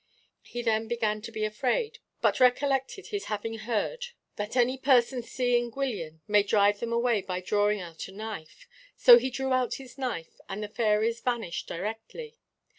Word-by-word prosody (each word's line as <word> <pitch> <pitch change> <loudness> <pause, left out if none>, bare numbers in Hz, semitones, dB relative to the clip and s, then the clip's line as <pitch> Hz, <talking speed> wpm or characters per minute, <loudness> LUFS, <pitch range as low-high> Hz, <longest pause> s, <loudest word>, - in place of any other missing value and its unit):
He 240 0 -6
then 225 -1 +1
began 220 -2 -1
to 230 +1 -8
be 215 -1 -2
afraid, 280 - -1 0.2
but - - +2
recollected 270 +6 +2
his 410 -1 -3
having 220 +1 -4
heard 235 - -2 0.3
that 210 +3 -4
any 250 +1 +3
person 260 -2 +3
seeing 240 0 0
Gwyllion 210 - -4
may 210 -1 +5
drive 205 0 +3
them 235 -1 -3
away 235 -2 +2
by 185 -1 -3
drawing 205 +2 +1
out 165 -2 -7
a - - -11
knife. 215 - -8 0.3
So 240 -1 +9
he 260 +2 -2
drew 265 +1 -1
out 255 -1 +1
his 265 0 -11
knife, 235 -11 -4
and 200 +2 -4
the 210 - -5
fairies 225 +1 +1
vanished 235 -9 -2
directly. 225 - -6
230 Hz, 170 wpm, -28 LUFS, 210-255 Hz, 0.3 s, So